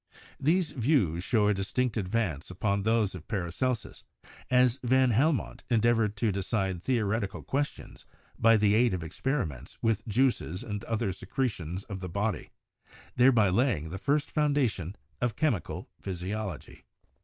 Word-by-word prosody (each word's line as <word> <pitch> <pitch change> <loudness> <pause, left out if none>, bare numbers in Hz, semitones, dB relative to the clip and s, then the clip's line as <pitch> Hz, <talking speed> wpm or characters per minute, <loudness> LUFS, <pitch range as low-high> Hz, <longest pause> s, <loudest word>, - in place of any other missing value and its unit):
These 165 +4 +2
views 115 - +1
show 105 -1 +2
a 105 - +4
distinct 105 +5 -1
advance 95 - -1
upon 100 +2 -1
those 110 -1 +2
of 90 -3 -9
Paracelsus, 105 +5 -2 0.5
as 125 0 +4
van 130 0 +3
Helmont 140 +6 +1
endeavored 115 -2 +2
to 110 -1 +1
decide 95 -2 -1
theoreti 110 -2 0
cal 100 - -9
questions 145 +2 -3 0.4
by 115 0 +6
the 105 -1 +3
aid 115 -2 +3
of 85 - -5
experiments 80 - -3
with 115 0 +1
juices 110 -6 +1
and 105 0 -5
other 110 -4 -1
secretions 95 - -3
of 100 -3 -7
the 90 -1 -5
body, 100 +3 -2 0.7
thereby 120 -5 +5
laying 95 - +1
the 95 - -5
first 145 +4 0
foun 150 -1 +1
dation 105 - 0 0.3
of 120 -3 0
chemical 145 - -1
physiology. 95 -3 -5
110 Hz, 145 wpm, -29 LUFS, 95-125 Hz, 0.7 s, by